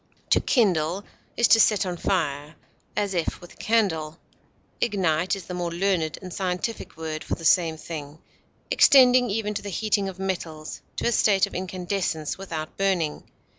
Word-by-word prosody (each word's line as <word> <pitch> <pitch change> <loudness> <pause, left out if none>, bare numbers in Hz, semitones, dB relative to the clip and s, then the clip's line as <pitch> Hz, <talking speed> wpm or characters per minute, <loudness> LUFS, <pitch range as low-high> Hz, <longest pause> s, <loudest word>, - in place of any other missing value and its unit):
To - - +5
kindle 185 - +1 0.3
is 235 - +4
to 225 - +7
set 210 -2 +4
on 180 -1 -3
fire, 150 -4 -2 0.4
as 200 -1 0
if 170 -3 -1
with 175 - -13
a - - -23
candle; 165 -9 0 0.6
ignite 185 -5 +1
is 190 -3 -9
the 180 - -7
more 175 -1 -2
learned 175 -3 0
and 185 -1 -7
scientific 185 +1 -3
word 160 -1 -5
for - - -2
the 165 - -9
same 165 -1 +3
thing, 155 -2 -7 0.5
extending 255 -2 +6
even 210 0 -1
to 205 - -4
the 200 - -6
heating 200 0 0
of 190 - -9
metals 170 -5 -4
to - - -3
a - - +2
state 200 -4 +3
of - - -13
incandescence 180 -3 -3
without 165 -5 -6
burning. 185 -6 -1
185 Hz, 170 wpm, -25 LUFS, 160-200 Hz, 0.6 s, to